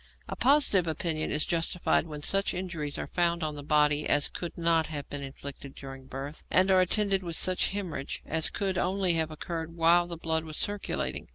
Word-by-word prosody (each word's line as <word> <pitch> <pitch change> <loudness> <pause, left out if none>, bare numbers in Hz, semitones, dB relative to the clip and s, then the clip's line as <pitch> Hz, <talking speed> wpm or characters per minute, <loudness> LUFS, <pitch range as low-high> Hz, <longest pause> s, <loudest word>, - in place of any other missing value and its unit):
A - - -5
positive 255 - +4
opinion 160 0 -1
is 150 - +1
justified 170 0 0
when 150 -2 -7
such 195 +3 +2
injuries 170 -6 -4
are - - -3
found 170 -1 0
on 155 -1 -1
the 145 - -7
body 150 0 +2
as 145 0 +4
could 175 - -6
not 165 -1 +2
have 145 -3 -6
been 145 - -4
inflicted 140 0 -8
during 135 -1 -10
birth, 140 +3 -7
and 185 +1 +4
are 185 -1 +6
attended 195 +1 +2
with 170 -3 -4
such 185 +2 +1
hæmorrhage 180 -8 -4
as 160 0 0
could 190 -3 -2
only 190 -1 +1
have 160 -1 0
occurred 165 +1 -5
while 170 +1 +4
the 170 -1 -6
blood 160 -1 -1
was 155 -1 -6
circulating. 205 0 -2
165 Hz, 195 wpm, -29 LUFS, 150-185 Hz, -, are